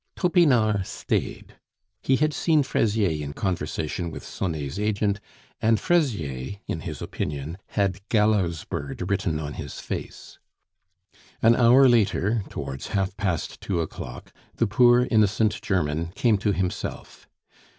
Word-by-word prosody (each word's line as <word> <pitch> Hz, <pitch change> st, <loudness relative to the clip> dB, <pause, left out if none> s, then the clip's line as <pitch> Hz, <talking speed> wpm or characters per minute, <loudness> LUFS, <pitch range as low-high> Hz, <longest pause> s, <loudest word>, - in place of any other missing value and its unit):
Topinard 125 Hz, -, +3 dB
stayed. -, -, -3 dB, 0.4 s
He 130 Hz, -, +2 dB
had 150 Hz, +3 st, +1 dB
seen 155 Hz, -1 st, +2 dB
Fraisier 100 Hz, -, +1 dB
in 70 Hz, 0 st, -5 dB
conversation 85 Hz, -1 st, -2 dB
with 80 Hz, -, -8 dB
Sonet's 80 Hz, -3 st, -4 dB
agent, 105 Hz, -1 st, 0 dB, 0.4 s
and 110 Hz, -1 st, +3 dB
Fraisier, 100 Hz, -, 0 dB
in 80 Hz, -, -3 dB
his 80 Hz, -3 st, -6 dB
opinion, 75 Hz, +5 st, -4 dB, 0.2 s
had 100 Hz, -2 st, +1 dB
gallows 105 Hz, -7 st, +2 dB
bird 70 Hz, +7 st, -5 dB
written 90 Hz, -5 st, 0 dB
on 75 Hz, -1 st, -5 dB
his 70 Hz, -4 st, -7 dB
face. -, -, -7 dB, 1.0 s
An 115 Hz, +1 st, +6 dB
hour 125 Hz, +3 st, +6 dB
later, 110 Hz, -2 st, +2 dB
towards 70 Hz, -1 st, -6 dB
half 95 Hz, 0 st, -1 dB
past 95 Hz, -6 st, -2 dB
two 90 Hz, -4 st, -1 dB
o'clock, 70 Hz, -6 st, -6 dB, 0.2 s
the -, -, +2 dB
poor, 120 Hz, +3 st, +5 dB
innocent 105 Hz, -1 st, +2 dB
German 80 Hz, -4 st, 0 dB
came 110 Hz, -1 st, +2 dB
to 105 Hz, +1 st, +1 dB
himself. 95 Hz, -2 st, -4 dB
100 Hz, 130 wpm, -25 LUFS, 80-115 Hz, 1.0 s, An